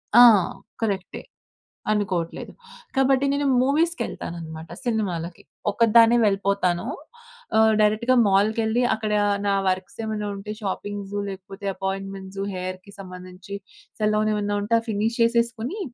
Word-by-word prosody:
ఆ! 245 Hz, -, +10 dB, 0.6 s
కరెక్టే. 195 Hz, -4 st, -2 dB, 0.7 s
అనుకోట్లేదు. 190 Hz, -6 st, -2 dB, 0.4 s
కాబట్టి 270 Hz, 0 st, +3 dB
నేను 285 Hz, 0 st, 0 dB, 0.2 s
మూవీస్‌కెళ్తాననమాట. 175 Hz, -, -2 dB, 0.2 s
సినిమాలకి 180 Hz, -7 st, -2 dB, 0.3 s
ఒక్కదాన్నే 230 Hz, +2 st, +5 dB
వెళ్ళిపోతాను. 195 Hz, -3 st, +1 dB, 0.7 s
ఆహ్, 220 Hz, 0 st, +5 dB
డైరెక్ట్‌గా 220 Hz, +4 st, +3 dB
మాల్‌కెళ్ళి 220 Hz, +4 st, +2 dB
అక్కడ 215 Hz, -1 st, -2 dB, 0.3 s
నా 200 Hz, -, +2 dB
వర్క్సేమైనా 210 Hz, +3 st, -2 dB
ఉంటే 205 Hz, +2 st, -7 dB
షాపింగ్స్ 205 Hz, 0 st, -4 dB
లేకపోతే 195 Hz, +1 st, -8 dB
అపాయింట్మెంట్స్ 195 Hz, 0 st, -5 dB, 0.2 s
హెయిర్‌కి 185 Hz, +2 st, -6 dB
సంబంధించి 185 Hz, +1 st, -9 dB, 0.4 s
సెలూనేమైనా 210 Hz, -1 st, +1 dB
ఉంటే 230 Hz, +3 st, +2 dB
ఫినీష్ 220 Hz, +2 st, -1 dB
చేసేసుకొని 235 Hz, -, +1 dB
205 Hz, 95 wpm, -24 LUFS, 190-225 Hz, 0.7 s, ఆ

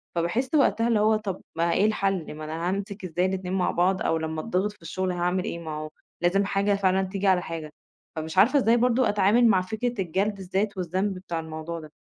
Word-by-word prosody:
فباحِس 175 Hz, +10 st, 0 dB
وقتها 235 Hz, -5 st, +3 dB
اللي 230 Hz, -3 st, +3 dB
هو 215 Hz, +1 st, +4 dB
طَب 210 Hz, -4 st, -4 dB, 0.2 s
ما 170 Hz, 0 st, +2 dB
إيه 200 Hz, -, +3 dB
الحَل، 195 Hz, -7 st, -1 dB
ما 155 Hz, -, -8 dB
أنا 165 Hz, +3 st, -3 dB
هامسك 200 Hz, 0 st, -4 dB
إزاي 180 Hz, +1 st, 0 dB
الاتنين 185 Hz, -1 st, -2 dB
مع 190 Hz, -1 st, +1 dB
بعض، 185 Hz, +2 st, +1 dB
أو 165 Hz, -, +1 dB
لمّا 160 Hz, 0 st, -3 dB
أتضّغط 205 Hz, 0 st, -1 dB
في 210 Hz, -, -22 dB
الشُغل 185 Hz, +3 st, -2 dB
هاعمل 180 Hz, +1 st, 0 dB
إيه 170 Hz, -, -4 dB
ما 160 Hz, -2 st, -6 dB
هو 155 Hz, 0 st, -5 dB, 0.3 s
لازم 190 Hz, +3 st, +2 dB
حاجة 200 Hz, +1 st, +1 dB
فعلًا 190 Hz, -1 st, +2 dB
تيجي 195 Hz, +1 st, -2 dB
على 185 Hz, -2 st, +4 dB
حاجة. 165 Hz, -3 st, -6 dB, 0.5 s
فمش 160 Hz, +2 st, -5 dB
عارفة 240 Hz, +9 st, +6 dB
إزاي 235 Hz, -2 st, +4 dB
برضه 245 Hz, 0 st, +3 dB
أتعامل 210 Hz, +4 st, +4 dB
مع 195 Hz, -4 st, +4 dB
فكرة 220 Hz, +4 st, -3 dB
الجَلْد 195 Hz, +4 st, -1 dB
الذات 195 Hz, +2 st, -2 dB
والذنب 185 Hz, +3 st, -1 dB
بتاع 175 Hz, -3 st, -4 dB
الموضوع 160 Hz, +1 st, -6 dB
ده؟ 155 Hz, -2 st, -12 dB
190 Hz, 215 wpm, -26 LUFS, 170-205 Hz, 0.5 s, عارفة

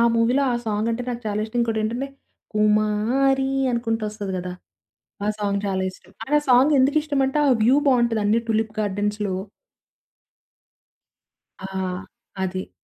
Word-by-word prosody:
మూవీలో 245 Hz, +5 st, +3 dB
ఆ -, -, 0 dB
సాంగ్ 215 Hz, +1 st, 0 dB
అంటే 230 Hz, +2 st, -2 dB
నాకు 240 Hz, 0 st, -4 dB
చాలా 210 Hz, 0 st, -1 dB
ఇష్టం. 225 Hz, +2 st, -6 dB
ఇంకోటేంటంటే, 230 Hz, +3 st, -1 dB, 0.5 s
'కుమారి' 215 Hz, +6 st, +2 dB, 0.2 s
అనుకుంటూ 230 Hz, -2 st, -1 dB
వస్తది 205 Hz, -2 st, -5 dB
కదా! 180 Hz, 0 st, -5 dB, 0.7 s
ఆ -, -, 0 dB
సాంగ్ 200 Hz, -1 st, 0 dB
చాలా 190 Hz, -1 st, -1 dB
ఇష్టం. -, -, -19 dB
అండ్ 295 Hz, +4 st, +1 dB
ఆ -, -, -9 dB
సాంగ్ 260 Hz, +4 st, +6 dB
ఎందుకిష్టమంటే 285 Hz, 0 st, +2 dB
ఆ -, -, +4 dB
వ్యూ 255 Hz, +5 st, +5 dB
బావుంటది 235 Hz, -4 st, +3 dB
అన్నీ 220 Hz, +3 st, +3 dB
టులిప్ 220 Hz, 0 st, 0 dB
గార్డెన్స్‌లో. 205 Hz, -1 st, -1 dB, 2.2 s
ఆ! 190 Hz, -, -7 dB, 0.8 s
అది. 185 Hz, 0 st, -4 dB
225 Hz, 130 wpm, -23 LUFS, 210-255 Hz, 2.2 s, సాంగ్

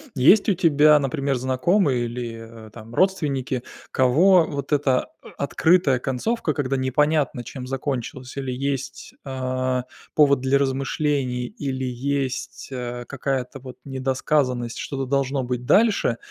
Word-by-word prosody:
Есть 190 Hz, -, +5 dB
у 200 Hz, -, +4 dB
тебя, 150 Hz, -3 st, +5 dB
например, 140 Hz, 0 st, -1 dB
знакомые 130 Hz, +2 st, +1 dB
или, 115 Hz, -2 st, -7 dB
э, -, -, -14 dB
там 115 Hz, 0 st, -11 dB
родственники, 140 Hz, -8 st, 0 dB, 0.3 s
кого 160 Hz, +8 st, +5 dB
вот 140 Hz, 0 st, -4 dB
эта, 135 Hz, -3 st, +2 dB, 0.2 s
э, -, -, -13 dB
открытая 145 Hz, -1 st, +2 dB
концовка, 155 Hz, -, -1 dB
когда 135 Hz, -1 st, -1 dB
непонятно 145 Hz, 0 st, +1 dB
чем 125 Hz, +1 st, -8 dB
закончилась, 130 Hz, -1 st, -4 dB
или 135 Hz, -2 st, -3 dB
есть, 135 Hz, +1 st, -4 dB
а, 130 Hz, -1 st, -2 dB, 0.3 s
повод 140 Hz, -3 st, +4 dB
для 135 Hz, +1 st, +3 dB
размышлений, 135 Hz, -2 st, -1 dB
или 130 Hz, 0 st, -4 dB
есть, 130 Hz, +1 st, -3 dB
а, 120 Hz, -1 st, -5 dB
какая-то 135 Hz, -1 st, -3 dB
вот 130 Hz, 0 st, -10 dB
недосказанность, 130 Hz, -2 st, -1 dB
что-то 135 Hz, -2 st, -4 dB
должно 135 Hz, 0 st, 0 dB
быть 125 Hz, 0 st, -3 dB
дальше, 205 Hz, -, +3 dB
135 Hz, 130 wpm, -23 LUFS, 125-145 Hz, 0.3 s, Есть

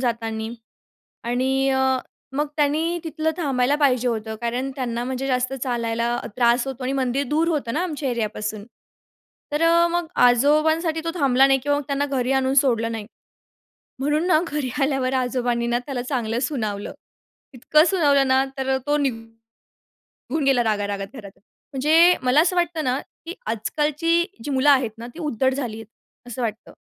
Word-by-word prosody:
जातानी 225 Hz, -2 st, -2 dB, 0.7 s
आणि 265 Hz, +3 st, +1 dB
अ, 265 Hz, -1 st, +2 dB, 0.4 s
मग 295 Hz, +2 st, 0 dB
त्यानी 315 Hz, +4 st, +1 dB
तिथलं 315 Hz, 0 st, -1 dB
थांबायला 275 Hz, -4 st, +1 dB
पाहिजे 255 Hz, -4 st, +2 dB
होतं, 220 Hz, -1 st, -3 dB
कारण 245 Hz, +3 st, -2 dB
त्यांना 240 Hz, -3 st, -2 dB
म्हणजे 260 Hz, +1 st, -3 dB
जास्त 255 Hz, -1 st, 0 dB
चालायला 235 Hz, -1 st, -1 dB, 0.2 s
त्रास 240 Hz, +1 st, +3 dB
होतो 265 Hz, -1 st, -6 dB
आणि 265 Hz, -, -1 dB
मंदिर 270 Hz, +1 st, 0 dB
दूर 320 Hz, +3 st, +1 dB
होतं 285 Hz, -8 st, -1 dB
ना 325 Hz, -, 0 dB
आमच्या 300 Hz, -5 st, -3 dB
एरियापासून 215 Hz, -2 st, -3 dB, 0.9 s
तर 295 Hz, +2 st, 0 dB
अ, 335 Hz, +1 st, +5 dB
मग 345 Hz, -1 st, -1 dB, 0.2 s
आजोबांसाठी 310 Hz, +6 st, +3 dB
तो 330 Hz, -, -1 dB
थांबला 270 Hz, -2 st, +4 dB
नाही 270 Hz, 0 st, +3 dB
किंवा 290 Hz, 0 st, +1 dB
त्यांना 285 Hz, 0 st, -1 dB
घरी 265 Hz, -2 st, -1 dB
आणून 265 Hz, 0 st, +1 dB
सोडलं 230 Hz, -5 st, +2 dB
नाही. 215 Hz, -2 st, -5 dB, 0.9 s
म्हणून 295 Hz, +4 st, 0 dB
ना 315 Hz, -4 st, +4 dB
घरी 290 Hz, -4 st, -2 dB
आल्यावर 270 Hz, -2 st, +1 dB
आजोबांनी 245 Hz, -2 st, 0 dB
ना, 240 Hz, 0 st, +1 dB
त्याला 270 Hz, -4 st, -3 dB
चांगलं 240 Hz, -3 st, -2 dB
सुनावलं. 215 Hz, -8 st, -3 dB, 0.6 s
इतकं 305 Hz, +5 st, +3 dB
सुनावलं 285 Hz, -8 st, +3 dB
ना 265 Hz, +1 st, +4 dB
तर 265 Hz, 0 st, 0 dB
तो 290 Hz, -, +2 dB
निघून 225 Hz, -4 st, -5 dB, 0.9 s
गेला 270 Hz, -3 st, +3 dB
रागारागात 205 Hz, -2 st, -1 dB
घरा 215 Hz, -5 st, -9 dB, 0.5 s
म्हणजे 320 Hz, +6 st, +5 dB
मला 255 Hz, +5 st, +4 dB
असं 360 Hz, +2 st, +1 dB
वाटतं 345 Hz, -2 st, 0 dB
ना, 255 Hz, 0 st, 0 dB, 0.3 s
की 335 Hz, -, -5 dB
आजकालची 300 Hz, +9 st, 0 dB, 0.2 s
जी 290 Hz, -, -4 dB
मुलं 270 Hz, +2 st, +3 dB
आहेत 260 Hz, -6 st, +4 dB
ना 235 Hz, -, -8 dB
ती -, -, -9 dB
उद्धट 265 Hz, -4 st, 0 dB
झाली 245 Hz, -5 st, -4 dB
आहेत, 225 Hz, -1 st, -10 dB, 0.4 s
असं 245 Hz, +1 st, -6 dB
वाटतं, 220 Hz, -1 st, -4 dB
265 Hz, 160 wpm, -23 LUFS, 235-295 Hz, 0.9 s, अ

